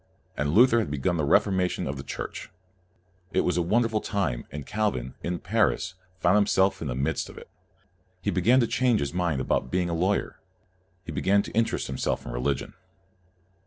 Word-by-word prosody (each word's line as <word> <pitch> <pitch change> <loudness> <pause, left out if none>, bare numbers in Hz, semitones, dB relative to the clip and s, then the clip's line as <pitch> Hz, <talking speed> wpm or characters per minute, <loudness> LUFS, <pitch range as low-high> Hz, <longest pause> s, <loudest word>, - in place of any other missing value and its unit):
And 75 +2 -1
Luther 120 +1 +6
had 110 - -1
begun 75 +5 -1
the 75 - 0
Reformation 95 +3 +2
of 65 - -3
the 70 - -6
Church. - - -6 0.8
It - - +3
was 90 - 0
a 90 - +2
wonderful 110 +4 +1
time, 75 - -2
and 75 -1 -6
Calvin, 100 - -1
in 85 0 -2
Paris, 95 - 0 0.3
found 90 +3 +4
himself 95 -2 +2
in 80 - -3
the - - -2
midst 65 +2 -1
of - - -13
it. - - -12 0.7
He 90 - -1
be 90 - 0
gan 120 +8 +5
to - - +3
change 125 0 +2
his 70 +2 -2
mind 85 -6 0
about 65 0 0
being 90 +3 0
a - - -1
lawyer. 95 +5 0 0.7
He - - -6
began 100 +1 +2
to - - -8
interest 115 +1 0
himself 65 - -2
in - - -5
religion. 65 +4 -2
90 Hz, 190 wpm, -26 LUFS, 70-105 Hz, 0.8 s, Luther